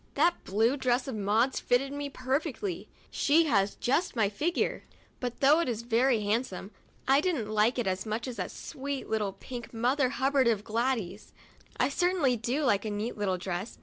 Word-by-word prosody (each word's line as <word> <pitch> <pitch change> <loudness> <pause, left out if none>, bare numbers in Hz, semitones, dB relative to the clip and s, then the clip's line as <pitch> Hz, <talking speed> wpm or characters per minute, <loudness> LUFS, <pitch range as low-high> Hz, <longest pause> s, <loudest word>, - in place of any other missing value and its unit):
That 345 - +2
blue 225 +7 +2
dress 250 -1 +1
of 265 - -3
Maud's 215 +5 +1
fitted 270 +3 +1
me 285 0 -4
perfectly; 300 - -3 0.2
she 325 +3 +3
has 200 -8 +2
just 275 +7 0
my 215 -4 +2
figure; 305 +13 -1 0.4
but 245 -2 -5
though 290 +4 +6
it 340 - 0
was 235 -2 -2
very 235 0 +2
handsome, 205 -2 -2 0.4
I 270 +2 +5
didn't 300 - -1
like 215 +4 +2
it 245 - 0
as 190 0 -1
much 225 +3 -3
as 245 -3 -6
that 185 - -3
sweet 275 0 -6
little 210 -3 -1
pink 240 +2 -9
Mother 255 +3 +2
Hubbard 265 0 +2
of 215 -3 +1
Gladys's. 225 -3 -2 0.5
I - - +3
certainly 355 -8 +2
do 240 +6 -1
like 205 -7 +2
a 220 - -3
neat 210 +3 -3
little 195 -3 -1
dress. 180 +3 -5
245 Hz, 180 wpm, -29 LUFS, 215-275 Hz, 0.5 s, though